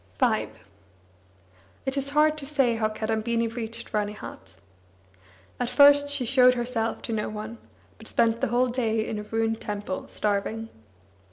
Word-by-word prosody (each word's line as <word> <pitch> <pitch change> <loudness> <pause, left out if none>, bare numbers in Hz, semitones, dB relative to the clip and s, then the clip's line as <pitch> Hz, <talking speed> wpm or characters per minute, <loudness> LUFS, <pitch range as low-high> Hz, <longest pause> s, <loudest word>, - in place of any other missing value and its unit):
V - - +2 1.4
It 265 - 0
is 275 0 0
hard 300 +1 +3
to 280 - -6
say 270 -6 +2
how 215 -1 +1
Kadambini 225 +2 -1
reached 230 0 -5
Ranihat. 210 - -5 1.0
At 245 -1 -1
first 285 +1 +6
she 285 -3 -1
showed 250 0 +5
herself 240 -2 -2
to 230 - -3
no 215 -1 -1
one, 215 +2 -7 0.4
but - - -10
spent 230 0 +2
the - - +2
whole 245 +2 +2
day 225 -3 0
in 215 - -3
a - - -4
ruined 225 +1 -1
temple, 205 -2 -4
starving. 215 +2 -2
230 Hz, 150 wpm, -26 LUFS, 220-255 Hz, 1.4 s, first